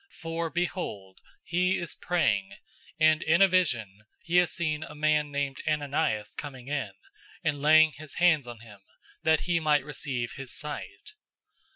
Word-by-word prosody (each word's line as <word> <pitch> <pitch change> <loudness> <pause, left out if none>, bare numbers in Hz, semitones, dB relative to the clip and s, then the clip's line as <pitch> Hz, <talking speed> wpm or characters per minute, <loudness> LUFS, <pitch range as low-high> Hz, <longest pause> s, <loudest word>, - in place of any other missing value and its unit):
For 165 0 -3
behold, 160 - -4 0.2
he 180 +2 +1
is 170 - -4
praying, 105 - 0 0.5
009:012 155 0 +7
and 155 +1 -1
in 170 +4 +3
a - - +7
vision 120 - 0 0.2
he 170 +1 +1
has 180 -1 +4
seen 155 -3 -1
a 155 - -8
man 150 0 +2
named 140 -1 -2
Ananias 145 -8 0
coming 135 -3 -8
in, 145 -2 -2 0.5
and 150 -3 -1
laying 155 +1 +6
his 150 0 -10
hands 160 -7 +3
on 120 -2 -9
him, 105 -4 -14 0.4
that 160 -1 +3
he 175 -2 +1
might 150 -3 +2
receive 130 -5 -4
his 135 -2 -8
sight." 150 - -7
150 Hz, 160 wpm, -28 LUFS, 135-165 Hz, 0.5 s, 009:012